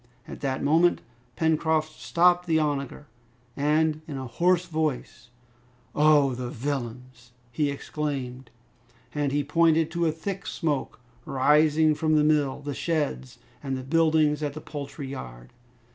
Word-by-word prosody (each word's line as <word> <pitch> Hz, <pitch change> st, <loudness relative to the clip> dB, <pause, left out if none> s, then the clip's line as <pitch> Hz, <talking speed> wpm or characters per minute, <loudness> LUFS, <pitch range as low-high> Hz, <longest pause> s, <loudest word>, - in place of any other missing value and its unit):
At -, -, -8 dB
that 135 Hz, -2 st, -2 dB
moment 165 Hz, +5 st, +3 dB, 0.4 s
Pencroft 160 Hz, -1 st, +1 dB
stopped 175 Hz, +1 st, +3 dB
the 160 Hz, -1 st, +3 dB
onager, 145 Hz, -2 st, -2 dB, 0.5 s
and 155 Hz, +2 st, +1 dB
in 145 Hz, -3 st, -5 dB
a 130 Hz, -, -5 dB
hoarse 175 Hz, +8 st, +1 dB
voice, 155 Hz, -7 st, -3 dB, 0.6 s
"Oh! 150 Hz, -3 st, +4 dB
the 125 Hz, 0 st, -5 dB
villains!" 125 Hz, -2 st, -6 dB, 0.2 s
he 145 Hz, +4 st, 0 dB
exclaimed. 135 Hz, -4 st, -4 dB, 0.6 s
And 145 Hz, -2 st, -1 dB
he 145 Hz, +1 st, 0 dB
pointed 160 Hz, +2 st, +2 dB
to 170 Hz, 0 st, 0 dB
a -, -, +2 dB
thick 190 Hz, +5 st, -6 dB
smoke 150 Hz, -9 st, -2 dB, 0.2 s
rising 150 Hz, +4 st, +3 dB
from 155 Hz, 0 st, +1 dB
the 150 Hz, -, +4 dB
mill, 150 Hz, -3 st, +1 dB
the 145 Hz, 0 st, -4 dB
sheds, 145 Hz, -, -2 dB, 0.2 s
and 135 Hz, -2 st, -3 dB
the 130 Hz, -, -6 dB
buildings 155 Hz, 0 st, +2 dB
at 145 Hz, -2 st, -2 dB
the 155 Hz, -, -7 dB
poultry 140 Hz, -1 st, -7 dB
yard. -, -, -9 dB
150 Hz, 140 wpm, -26 LUFS, 135-160 Hz, 0.6 s, Oh